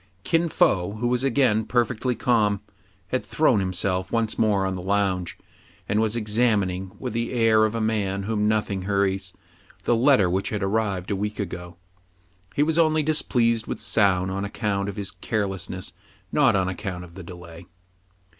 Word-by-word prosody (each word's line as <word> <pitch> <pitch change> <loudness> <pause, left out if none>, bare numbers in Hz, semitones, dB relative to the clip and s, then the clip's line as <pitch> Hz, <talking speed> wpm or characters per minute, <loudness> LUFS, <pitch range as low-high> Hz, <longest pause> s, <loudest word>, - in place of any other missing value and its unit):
Kin 165 +1 +1
Fo, 100 - +2
who 115 +3 -2
was 125 +1 +1
again 125 -5 +2
perfectly 120 +1 0
calm, 110 -4 +2 0.5
had 130 - -1
thrown 140 -8 +2
himself 95 0 -1
once 115 -2 0
more 105 -3 +2
on 95 - -1
the 90 - -5
lounge, 95 -2 0 0.5
and 105 +2 +1
was 110 0 +1
examin 105 -3 +2
ing, 90 +1 -6
with - - -5
the 115 0 -2
air 115 -3 +4
of 110 +1 -2
a - - -1
man 100 -3 -1
whom 105 0 0
nothing 105 -3 0
hurries, 95 -1 0 0.5
the 120 - +2
letter 125 -4 +4
which 95 +3 0
had 105 -2 -2
arrived 100 -2 -1
a - - +1
week 105 +2 -3
ago. 90 -3 -6 0.8
He 145 - +3
was 160 +2 +1
only 155 -1 +3
displeased 115 -7 +1
with - - -4
Soun 95 -3 +2
on 100 +1 -2
account 100 -1 -2
of 100 - -6
his 100 -1 -3
care 110 -3 -2
lessness, 95 -1 -4 0.4
not 135 -7 +4
on 95 -1 +1
account 90 -1 -4
of 85 -1 -13
the 95 - -9
delay. 85 -1 -11
105 Hz, 175 wpm, -24 LUFS, 95-115 Hz, 0.8 s, air